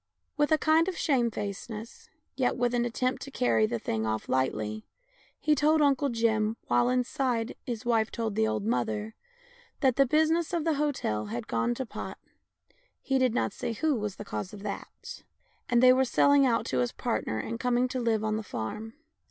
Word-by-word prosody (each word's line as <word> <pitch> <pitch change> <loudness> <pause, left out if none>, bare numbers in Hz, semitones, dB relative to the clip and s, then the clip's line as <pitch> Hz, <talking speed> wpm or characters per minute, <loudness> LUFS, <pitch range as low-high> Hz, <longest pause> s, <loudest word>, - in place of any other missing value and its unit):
With 295 +1 +1
a 315 - +6
kind 315 +2 +3
of 375 - -3
shame 250 -6 +2
facedness, 220 - -7 0.3
yet 255 -2 0
with 245 0 +1
an 240 0 +1
attempt 255 +2 -1
to 275 - -7
carry 115 - +2
the 115 - -2
thing 110 -1 -2
off 110 0 -2
lightly, 110 -5 -1 0.5
he 305 - +2
told 300 +2 +3
Uncle 280 -1 +3
Jim, 225 -2 +1
while, 120 0 +2
inside, 250 -2 0
his 240 -1 -4
wife 225 -2 +2
told 225 -2 -3
the 110 - +2
old 110 -2 -2
mother, 110 -2 -1 0.7
that 260 -4 +3
the 275 -1 +5
business 315 +4 +2
of 335 -3 0
the 325 0 +2
hotel 275 - -1
had 120 +3 -5
gone 115 - 0
to 260 - -3
pot - - -7 0.8
(he 270 -1 0
did 255 -3 +2
not - - 0
say 240 -2 -3
who 310 +6 +1
was 210 -5 -3
the 210 - -8
cause 195 -1 -5
of 205 -1 -9
that), - - -7 0.5
and 240 0 +3
they 255 0 +8
were 260 +1 +3
selling 280 +2 +4
out 230 -2 +1
to 130 - -1
his 125 -1 +1
partner 110 0 -2
and 230 - -4
coming 250 0 +2
to 255 - -2
live 225 -3 +1
on 215 0 0
the - - -3
farm. 215 - -6
235 Hz, 195 wpm, -28 LUFS, 185-265 Hz, 0.8 s, they